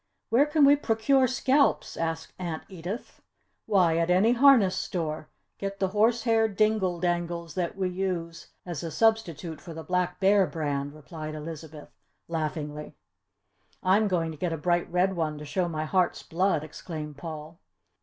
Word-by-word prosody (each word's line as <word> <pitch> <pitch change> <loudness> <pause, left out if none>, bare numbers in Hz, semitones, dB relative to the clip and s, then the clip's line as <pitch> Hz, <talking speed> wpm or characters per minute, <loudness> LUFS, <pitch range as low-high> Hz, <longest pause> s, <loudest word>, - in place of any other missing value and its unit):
"Where 265 +6 +5
can 300 -1 +4
we 285 +1 +7
procure 260 +1 +2
scalps?" 265 +3 +2
asked 165 -1 -3
Aunt 170 -3 -4
Edith. 190 +5 -7 0.5
"Why, 180 -6 +3
at 165 +1 +1
any 190 +6 +4
harness 245 -6 +5
store. 155 -3 -3 0.3
Get 200 0 -4
the 190 - +1
horsehair 225 +2 +3
dingle 210 -4 +1
dangles 170 -2 -2
that 180 +2 -2
we 190 -1 0
use 180 -3 -3 0.2
as 175 -5 -5
a 165 - -4
substitute 175 -6 0
for 170 -3 -9
the 160 - -7
Black 180 0 -1
Bear 195 -1 +4
brand," 145 -2 -3
replied 155 +1 -7
Elizabeth, 155 -1 -8 0.4
laughingly. 150 -2 -4 0.9
"I'm 200 +4 +4
going 170 -4 0
to 155 - -9
get 175 0 -1
a 165 - -2
bright 175 +2 0
red 185 +2 +2
one 155 -3 -1
to 150 - -8
show 175 +4 -1
my 155 -1 -3
heart's 180 +2 +1
blood!" 180 -2 0
exclaimed 155 -1 -7
Paul. 155 +2 -8
175 Hz, 155 wpm, -27 LUFS, 160-200 Hz, 0.9 s, we